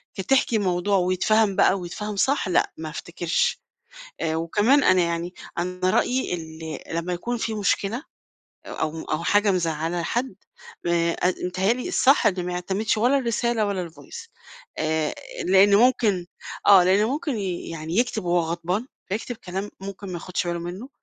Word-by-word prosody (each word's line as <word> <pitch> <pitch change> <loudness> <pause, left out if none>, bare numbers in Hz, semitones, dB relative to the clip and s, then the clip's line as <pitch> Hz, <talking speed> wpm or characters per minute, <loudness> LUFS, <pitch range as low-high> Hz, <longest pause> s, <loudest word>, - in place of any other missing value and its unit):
كتحكي 240 +4 +2
الموضوع 195 0 +1
ويتفهَم 190 +3 +2
بقى 195 - +4
ويتفهَم 205 +4 -5
صح، 265 +3 +1
لأ 180 - +2
ما 160 -1 -5
أفتكرش. 170 +2 -1 0.6
آآ، 160 -1 0
وكمان 210 - +3
أنا 185 -1 +5
يعني 170 +1 -2 0.2
أنا 180 +1 0
رأيي 255 0 +1
ال 160 -2 -6 0.2
لمّا 170 +2 -2
يكون 235 +8 -2
في 225 -1 -2
مشكلة 210 +4 0 0.7
أو 160 +1 -3
أو 155 +2 -2
حاجة 205 +3 +3
مزعّلة 165 -1 -1
حد 245 +8 -2 0.5
آآ، 170 0 +2
ات 180 0 0
بيتهيّأ 185 +4 +1
لي 250 +1 -5
الصح 275 -9 +4
إن 180 -3 -1
ما 180 - -3
يعتمدش 190 +5 -1
ولا 250 +6 +3
الرسالة 235 -2 0
ولا 190 -4 -2
الvoice. 460 - -11 0.5
آآ 155 -1 0 0.3
لإنّه 195 +2 +6
ممكن 210 -8 +1 0.4
آه، 195 -3 +8
لإنّه 195 +5 +3
ممكن 290 -1 -2
يعني 170 -3 -4
يكتب 225 -4 0
وهو 175 0 +2
غضبان، 180 +6 -2 0.2
فيكتب 225 +5 -3
كلام 195 0 -5
ممكن 195 +1 -7
ما 185 - -6
ياخدش 175 +1 -3
باله 175 0 -2
منّه، 180 +9 -7
185 Hz, 155 wpm, -24 LUFS, 175-215 Hz, 0.7 s, آه